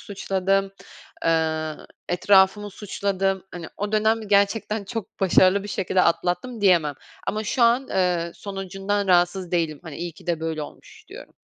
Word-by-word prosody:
suçladım. 195 0 -1 0.5
Eee, 160 -1 +1 0.3
etrafımı 190 +3 +3
suçladım. 195 -1 -2
Hani, 175 -2 -7
o 205 +1 -3
dönem 220 +1 +2
gerçekten 205 +1 +1
çok 225 -1 -7
başarılı 190 +1 +4
bir 205 - -8
şekilde 190 -2 +1
atlattım 180 +7 0
diyemem 170 -7 +3 0.3
ama 215 +1 -2
şu 240 +4 0
an, 240 +3 +3
eee, 180 -2 0
sonucundan 195 +1 -3
rahatsız 180 0 +2
değilim. 165 -4 -1
Hani, 160 -5 -8
iyi 170 0 -5
ki - - -18
de 170 -2 -1
böyle 160 -1 -3
olmuş - - -12
diyorum. - - -12
190 Hz, 145 wpm, -24 LUFS, 175-205 Hz, 0.5 s, başarılı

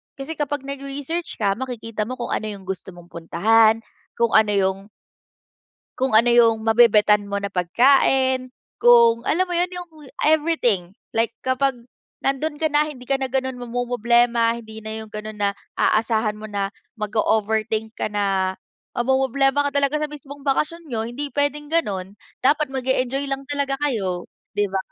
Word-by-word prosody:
Kasi 275 +3 -7
kapag 290 -1 -2
nag-research 275 +4 -5
ka 200 -1 0
makikita 230 -4 -4
mo 255 - -4
kung 240 -2 -5
ano 215 - -1
yung 200 -2 -7
gusto 190 -1 -6
mong 175 0 -15
puntahan, 220 +7 +3 0.3
kung 235 -1 +1
ano 220 -1 +4
yung 190 -1 +1 1.2
Kung 260 -3 0
ano 230 +2 +6
yung 230 -2 +4
mabebetan 215 -2 +4
mo 200 0 -2
na 200 - -3
pagkain, 255 +7 +3 0.3
kung 235 -1 +6
alam 365 +4 +2
mo 355 - -2
'yon, 355 +1 +1
yung 355 -1 -7 0.3
everything. 295 - +2 0.2
Like, 230 0 0
kapag 265 +1 +1 0.5
nando'n 295 +2 -1
ka 315 - +2
na, 295 +1 +3
hindi 255 -5 -10
ka 275 - +3
na 265 - -1
gano'n 260 0 -2
mamomroblema. 240 -1 +1
Hindi 220 -1 -11
na 220 - -5
yung 220 - -12
gano'n 215 0 -6
na 200 -1 +2 0.2
aasahan 220 -1 +1
mo 215 - -7
na 200 -2 -2 0.2
mag-o-overthink 220 0 -1
ka - - -1
na, 195 -2 0 0.4
mamomroblema 270 +3 +2
ka - - 0
talaga 280 +1 +2
sa 305 - -1
mismong 285 -1 -10
bakasyon 310 +5 0
niyo, 235 -6 -3
hindi 280 +4 -5
puwedeng 290 +1 -1
gano'n. 200 - -1 0.3
Dapat 295 +2 +3
mag-e-enjoy 265 +1 -1
lang 275 0 -3
talaga 280 -1 0
kayo, 195 -11 -1 0.3
'di 205 0 +1
ba? 195 - -1
240 Hz, 160 wpm, -22 LUFS, 215-275 Hz, 1.2 s, ano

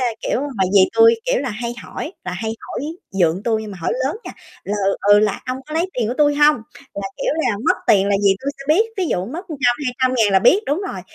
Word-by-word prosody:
a, 255 - +1
kiểu, - - -1
mà 260 -10 -1
dì 200 - +6
tui, 455 0 +6
kiểu - - +1
là, 270 - -3
hay 235 +2 -4
hỏi 320 - -7
là 180 - -4
hay 220 +5 -3
hỏi - - -6 0.3
dượng 185 0 +1
tui 220 -1 0
nhưng 215 - -8
mà 190 - -9
hỏi - - -1
lớn 285 - -1
nha, - - -7 0.3
là, 205 - -2
ừ, 195 - +1 0.2
ừ, 205 - +7
là 210 -2 0
"Ông 255 +1 -3
có 305 - -7
lấy 335 +3 +1
tiền 230 -3 -1
của 245 - -2
tui 290 -1 +4
hông?" 295 +1 +5 0.4
Là, 195 -1 -4
kiểu - - -1
là, 205 - 0
mất - - +3
tiền 200 0 +4
là 200 - +3
dì 195 -1 +4
tui 280 - -2
sẽ 275 - -9
biết, 355 +9 +4
ví 375 - 0
dụ 180 - -1
mất 315 +9 -6
trăm, 270 -6 +1
200.000 250 -5 +1
là 190 - +6
biết, 360 - +5
đúng 295 +6 0
rồi. - - -6
245 Hz, 265 wpm, -20 LUFS, 200-295 Hz, 0.4 s, ừ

